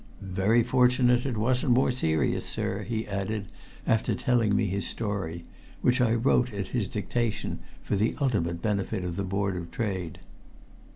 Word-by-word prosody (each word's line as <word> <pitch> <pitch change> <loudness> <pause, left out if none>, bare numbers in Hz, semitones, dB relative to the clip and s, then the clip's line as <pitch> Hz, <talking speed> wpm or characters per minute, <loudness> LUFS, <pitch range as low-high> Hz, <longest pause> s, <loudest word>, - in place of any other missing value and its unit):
"Very 105 +5 +3
fortunate 125 +1 +3
it 125 -4 -2
wasn't 125 +3 +2
more 130 +1 +3
serious, 80 -11 +1
sir," 105 -2 -2
he 110 +1 -3
added, 100 0 -3 0.4
after 110 -1 +1
telling 115 -5 +2
me 110 - +2
his 100 +1 -1
story, 95 -6 -3 0.4
which 125 0 +3
I 115 -2 +3
wrote 125 +1 +2
at 100 -2 -4
his 115 -6 0
dictation 110 +3 -2 0.2
for - - -1
the 105 +3 +1
ultimate 85 - 0
benefit 100 -3 -1
of 85 -1 -3
the 100 - -2
Board 95 0 -1
of 85 -1 -5
Trade. 95 -9 -3
105 Hz, 160 wpm, -27 LUFS, 95-120 Hz, 0.4 s, Very